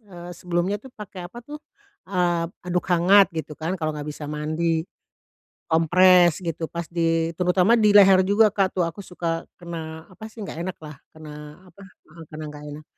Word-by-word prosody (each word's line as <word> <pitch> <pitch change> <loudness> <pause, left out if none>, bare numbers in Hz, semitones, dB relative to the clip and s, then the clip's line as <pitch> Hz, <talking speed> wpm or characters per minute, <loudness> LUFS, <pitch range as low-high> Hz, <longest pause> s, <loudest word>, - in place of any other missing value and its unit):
eee, 175 -1 -9
sebelumnya 180 +2 -1
tuh 265 - -12
pakai 185 -4 -9
apa 235 - -10
tuh, 300 +1 -8 0.5
eee, 175 -3 0 0.2
handuk 180 0 0
hangat 185 +3 +5
gitu 160 -2 -6
kan 165 +5 -4
kalau 155 -1 -2
nggak 150 0 -5
bisa 150 0 -8
mandi. 155 +2 -1 0.9
Kompres 175 +1 +5
gitu 165 -2 -3
pas 170 0 -5
di, 165 -1 0
terutama 180 +5 +3
di 210 -2 +4
leher 195 -2 +7
juga, 210 +3 +4
Kak, 195 -2 0
tuh, 180 - 0
aku 200 - -10
suka 170 -2 -4
kena, 160 -2 -7
apa 185 +4 -11
sih, 220 0 -12
nggak 195 - -7
enaklah 155 -5 -8 0.2
kena 155 -1 -12 0.4
apa 200 - -18
heeh, 165 -3 -16
kena 155 0 -8
nggak 150 0 -11
enak. 150 +1 -10
175 Hz, 175 wpm, -23 LUFS, 160-185 Hz, 0.9 s, leher